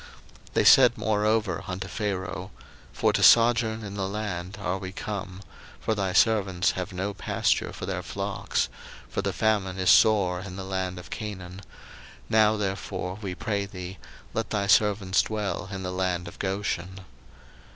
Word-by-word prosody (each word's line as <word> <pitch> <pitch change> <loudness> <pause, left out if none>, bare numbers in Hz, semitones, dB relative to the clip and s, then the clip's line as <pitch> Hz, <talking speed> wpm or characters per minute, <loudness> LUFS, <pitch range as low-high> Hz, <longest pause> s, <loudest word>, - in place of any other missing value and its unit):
01:047:004 - - -15 0.4
They - - +3
said 125 -3 +7
moreover 105 -3 +1
unto 90 0 -4
Pharaoh, 95 -3 -3 0.4
For - - +1
to - - +1
sojourn 115 -1 +5
in 100 -1 -6
the 100 -1 -2
land 100 -1 -4
are 95 -1 -2
we 95 -1 -6
come; 100 -1 -6 0.4
for 110 - 0
thy 100 -3 -1
servants 95 -3 +3
have 90 -1 -5
no 95 +2 -3
pasture 95 - 0
for - - -6
their - - -3
flocks; - - -2 0.4
for - - -2
the - - -1
famine 100 -4 0
is 95 -1 +4
sore 95 -5 +4
in 90 -1 -8
the 95 - -5
land 95 -1 -3
of 90 - -10
Canaan: 95 -4 -6 0.7
now 110 0 +4
therefore, 95 -1 -3
we 95 -3 -4
pray 100 -2 -2
thee, 95 -1 -8 0.3
let 110 -1 -2
thy 100 -2 0
servants 100 -1 +3
dwell 105 -2 -3
in 95 -1 -5
the 90 - -3
land 90 -1 -1
of 85 - -11
Goshen. 95 -1 -3
95 Hz, 160 wpm, -26 LUFS, 95-105 Hz, 0.7 s, said